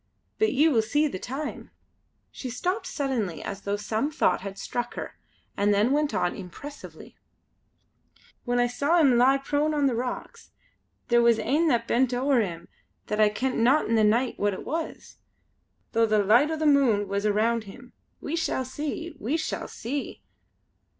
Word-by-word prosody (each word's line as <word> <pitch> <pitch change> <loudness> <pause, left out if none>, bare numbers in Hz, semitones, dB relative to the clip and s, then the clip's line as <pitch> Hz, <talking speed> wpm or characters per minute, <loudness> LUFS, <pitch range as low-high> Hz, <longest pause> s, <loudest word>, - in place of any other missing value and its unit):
But 435 - +3
ye 295 +4 +4
will 250 -8 +3
see 290 +8 +1
the 185 - -5
time 275 +7 -6 0.3
" - - -44 0.3
She 255 - -7
stopped 365 - -2
suddenly 245 - -2
as 195 0 -6
though 200 0 -2
some 220 +6 -2
thought 185 - +1
had 195 0 -7
struck 240 +3 -4
her, - - -7 0.4
and 205 +1 +2
then 210 +5 +2
went 295 +1 +1
on 175 - 0
impressively: 280 +10 -10 1.3
"When 245 -1 -1
I 245 - +4
saw 280 +7 +1
him 265 -6 +4
lie 265 +2 +5
prone 290 +3 0
on 290 -1 +2
the 265 - +2
rocks 245 +2 -5 0.6
there 240 0 +5
was 235 -1 +4
ane 290 +9 +1
that 235 -5 +1
bent 250 0 +2
ower 265 +1 +2
him 170 -5 -5 0.4
that 210 - -3
I 210 - +6
kent 255 +5 -2
not 260 +7 +3
in 230 - 0
the 220 -1 +4
nicht 235 +4 +2
wha 205 - +1
it 195 -2 -3
was, 325 +1 -5 0.7
though 230 -1 +3
the 215 -1 +2
licht 235 +9 +4
o' 320 - -2
the 310 - -1
moon 260 -9 +3
was 200 +2 -1
around 220 +2 +1
him. 245 +5 -13 0.3
We 305 - -4
shall 290 -5 -1
see! 300 +5 -5
We 270 +10 -1
shall 315 - -4
see!" 275 +5 -5
245 Hz, 180 wpm, -26 LUFS, 215-290 Hz, 1.3 s, I